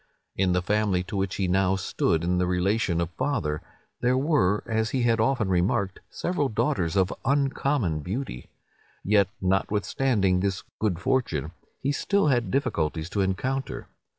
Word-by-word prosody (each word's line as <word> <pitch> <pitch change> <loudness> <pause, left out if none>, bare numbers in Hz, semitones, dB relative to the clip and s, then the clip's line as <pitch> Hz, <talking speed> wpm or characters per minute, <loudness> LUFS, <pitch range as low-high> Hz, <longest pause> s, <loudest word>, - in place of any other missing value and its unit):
In 95 -1 +2
the 90 0 +1
family 105 -2 +1
to 95 +3 -7
which 95 -1 -1
he 95 - 0
now 95 +1 +2
stood 85 -3 0
in 90 +1 +1
the 90 - +1
relation 90 0 +1
of 85 0 -1
father, 85 - -1 0.4
there 125 +1 +2
were, 130 - +2
as 110 -2 0
he 130 0 0
had 115 -1 +3
often 110 -2 +2
remarked, 95 +1 +1
several 150 -6 -1
daughters 90 -5 0
of 95 -1 +2
uncommon 135 - +1
beauty. 90 - -5 0.5
Yet 100 -1 +4
notwithstanding 95 +1 +1
this 100 +1 -1 0.2
good 105 -6 0
fortune, 115 - 0 0.3
he 140 - +1
still 200 +3 +1
had 120 -6 +1
difficulties 85 - -1
to 100 - 0
encounter. 125 +8 -2
100 Hz, 150 wpm, -26 LUFS, 90-125 Hz, 0.5 s, Yet